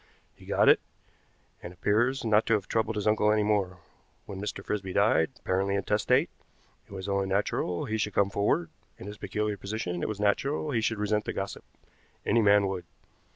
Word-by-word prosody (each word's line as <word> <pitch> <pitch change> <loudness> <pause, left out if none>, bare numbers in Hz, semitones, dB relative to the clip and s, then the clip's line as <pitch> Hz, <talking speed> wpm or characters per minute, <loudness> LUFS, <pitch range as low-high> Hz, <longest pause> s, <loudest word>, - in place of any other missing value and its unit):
He - - -17
got - - +2
it, - - +7 0.8
and 85 - -8
appears 120 +8 +1
not 110 0 +3
to 115 - +4
have 100 -2 -3
troubled 110 0 0
his 105 - -2
uncle 105 0 +3
any 105 0 +2
more. 100 -3 0 0.5
When 95 -1 -7
Mr. 100 -1 -5
Frisby 95 -3 -3
died, - - +3
apparently 95 +1 0
intestate, 105 - +1 0.6
it - - -21
was 95 0 -6
only 100 -1 0
natural 95 -2 -1
he 110 0 -2
should 105 -2 -2
come 100 -1 +2
forward; 100 -5 0 0.3
in - - -10
his 105 +1 -8
peculiar 105 +1 -2
position 100 -3 -4
it - - -2
was 105 -2 -4
natural 135 +9 0
he 115 -4 +1
should 110 0 0
resent 105 +1 0
the - - -3
gossip. 95 0 -5 0.6
Any 115 - +3
man 100 -1 +5
would. 95 -2 -3
105 Hz, 190 wpm, -28 LUFS, 95-110 Hz, 0.8 s, it